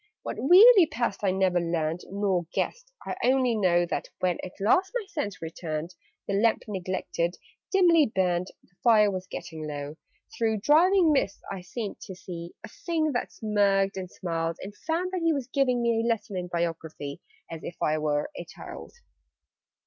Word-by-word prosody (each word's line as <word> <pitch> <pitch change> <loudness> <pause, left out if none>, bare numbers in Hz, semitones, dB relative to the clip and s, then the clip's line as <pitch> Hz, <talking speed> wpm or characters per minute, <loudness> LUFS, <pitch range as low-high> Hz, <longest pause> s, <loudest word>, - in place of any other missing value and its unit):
What - - -5
really 375 - +8
passed 235 -9 -2
I 195 - +3
never 185 -1 +2
learned, 165 0 -1
Nor 190 -4 0
guessed: - - -3
I - - -3
only 255 -1 +3
know 175 -4 +3
That, 175 - -4
when 180 -2 0
at 185 - -9
last 360 - +3
my 475 -4 -1
sense 205 - -4
returned, 160 0 -5 0.3
The 200 - -1
lamp, 220 +3 +2
neglected, 185 -3 -2 0.4
dimly 345 -5 +5
burned 185 -3 0 0.2
The - - -30
fire 215 -3 +5
was 185 -1 -5
getting 160 -3 -7
low 145 +1 -6 0.4
Through 220 -3 0
driving 340 - +5
mists 200 -8 0
I 195 -2 -5
seemed 205 +3 -6
to 190 - -9
see 175 -2 -8
A - - -7
Thing 320 -3 -1
that 245 - -2
smirked 200 -2 +1
and 185 -1 -5
smiled: 165 -2 -3
And 200 +1 -8
found 335 - -2
that 370 -2 -2
he 330 -1 +3
was 275 -4 -2
giving 255 -2 +1
me 230 -1 +2
A 230 - -1
lesson 225 -4 -1
in 180 -1 -3
Biography, 165 -4 -4 0.3
As 165 -1 -7
if 170 - -6
I 155 0 +1
were 150 - -1
a - - -5
child. - - -10
195 Hz, 175 wpm, -27 LUFS, 175-255 Hz, 0.4 s, really